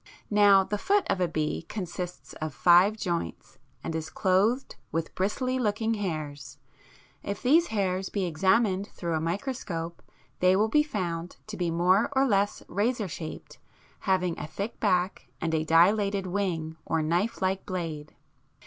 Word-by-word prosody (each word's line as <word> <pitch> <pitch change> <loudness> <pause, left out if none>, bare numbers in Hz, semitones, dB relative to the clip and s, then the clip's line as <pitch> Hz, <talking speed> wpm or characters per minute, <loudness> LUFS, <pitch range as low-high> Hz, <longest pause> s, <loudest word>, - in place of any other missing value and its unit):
Now 205 -2 +6
the 205 +2 -3
foot 400 - +2
of 185 - 0
a 180 - +3
bee 155 -2 -2
consists 180 -3 -6
of 155 -3 -3
five 180 +5 +5
joints, 170 - -4 0.2
and - - -3
is 160 -1 -3
clothed 195 +10 +1 0.2
with 165 0 -2
bristly 255 +7 -1
looking 220 0 0
hairs. 155 -8 -4 0.6
If 200 - -5
these 320 +7 +5
hairs 190 -3 -1
be 200 -3 -1
examined 190 +3 +2
through 170 -2 -3
a 160 - 0
microscope 170 - -3 0.4
they 185 +1 +5
will 215 +3 +2
be 300 +6 +4
found 180 - -3
to 215 - -7
be 175 -3 -1
more 180 +7 +3
or 270 0 +3
less 205 -4 +1
razor 215 +2 0
shaped, 160 -1 -8 0.5
having 180 -3 +1
a - - -5
thick 195 +8 -5
back 185 -2 0
and 165 0 -2
a 160 -1 +1
dilated 195 +5 +3
wing 175 -4 -2
or 160 -1 0
knife 175 +8 0
like 190 0 0
blade 165 -6 -4
(fig. - - -27
185 Hz, 160 wpm, -28 LUFS, 165-210 Hz, 0.6 s, Now